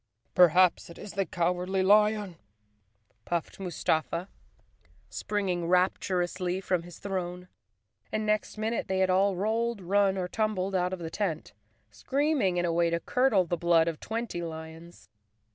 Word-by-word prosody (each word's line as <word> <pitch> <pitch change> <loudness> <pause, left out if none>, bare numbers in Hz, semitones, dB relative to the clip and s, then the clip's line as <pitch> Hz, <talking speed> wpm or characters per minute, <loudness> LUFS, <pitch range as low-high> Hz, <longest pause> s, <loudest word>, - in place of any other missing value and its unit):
"Perhaps 180 0 +4
it 170 - -11
is 205 - -9
the 195 -2 -1
Cowardly 180 +2 0
Lion," 210 -2 +3 0.9
puffed 170 +1 -3
Mustafa, 170 -1 -1 0.8
springing 185 -5 -2
rapturously 180 0 0
from 185 -2 0
his 175 0 -12
throne, 180 -2 -4 0.6
and 215 0 -1
next 215 0 0
min¬ 220 +2 -1
ute - - -3
they 190 - -1
had 190 0 +2
all 195 +1 +3
rolled, 225 +4 -1
run 195 +1 +2
or 180 -1 -2
tumbled 200 -2 -1
out 180 -1 +1
of 185 - -3
the 165 -2 -6
tent, 170 -5 -3 0.4
screaming 275 - 0
in 175 - +1
a 170 - 0
way 170 0 +2
to 170 0 0
curdle 250 -3 +2
the 175 - -1
blood 170 -1 +3
of 165 -2 -3
twenty 225 -5 -4
lions. 160 +1 -9
185 Hz, 150 wpm, -28 LUFS, 175-205 Hz, 0.9 s, Perhaps